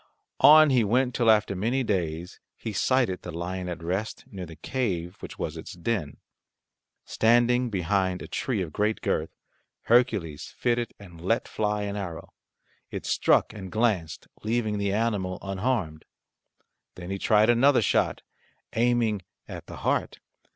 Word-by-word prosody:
On 155 -1 +8
he 125 -3 +4
went 125 +4 +1
till 115 -2 +2
after 105 -2 +3
many 120 +8 0
days 90 -5 -2 0.2
he 110 - -5
sighted 120 -4 +1
the - - -7
lion 90 +2 -4
at 85 -1 -6
rest 95 +6 -3
near 95 -3 -6
the 80 - -10
cave 90 -7 -3
which - - -9
was - - -4
its - - -8
den. 90 -5 -3 0.9
Standing 120 +2 +3
behind 95 -1 0
a - - -8
tree 115 -8 -2
of 80 -3 -8
great 105 +1 0
girth, - - -1 0.5
Hercules 110 - +1
fitted 120 -1 0
and 85 -5 -13
let 115 +7 0
fly 105 -1 -1
an 100 0 -3
arrow. 90 -5 -6 0.6
It - - -6
struck - - +2
and 95 -4 -8
glanced, 105 -9 0
leaving 110 -1 -1
the 100 -1 0
animal 100 -4 -1
unharmed. 95 -5 -2 0.9
Then 90 +1 -7
he 100 - -3
tried 110 +3 +4
another 125 +1 +4
shot, - - +1 0.5
aiming 115 -3 +2 0.3
at - - -8
the - - -9
heart. - - 0
105 Hz, 150 wpm, -26 LUFS, 90-120 Hz, 0.9 s, On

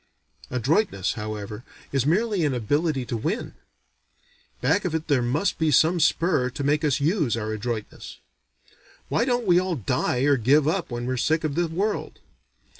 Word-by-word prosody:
Adroitness 125 - 0
however 105 0 -6 0.3
is 135 -1 0
merely 200 +2 +1
an 145 -4 +1
ability 140 +4 0
to 120 - -4
win; 165 - -3 1.1
back 205 - +1
of 175 -3 -2
it 160 0 -3
there 140 -5 +2
must 140 +11 0
be 160 -1 +2
some 165 +4 +4
spur 160 -4 +2
to 140 +3 -5
make 145 +2 +1
us 145 -3 +1
use 150 - +1
our 110 -1 -3
adroitness. 110 0 -5 0.9
Why 235 - +1
don't 245 -2 0
we 175 -2 +5
all 185 -1 -1
die 125 0 -1
or 140 0 +3
give 140 +5 +3
up 170 +2 -1
when 120 -1 -4
we're 130 +1 -2
sick 160 +6 +1
of 155 -2 -1
the 175 +3 0
world? 195 +7 -2
145 Hz, 170 wpm, -24 LUFS, 125-170 Hz, 1.1 s, we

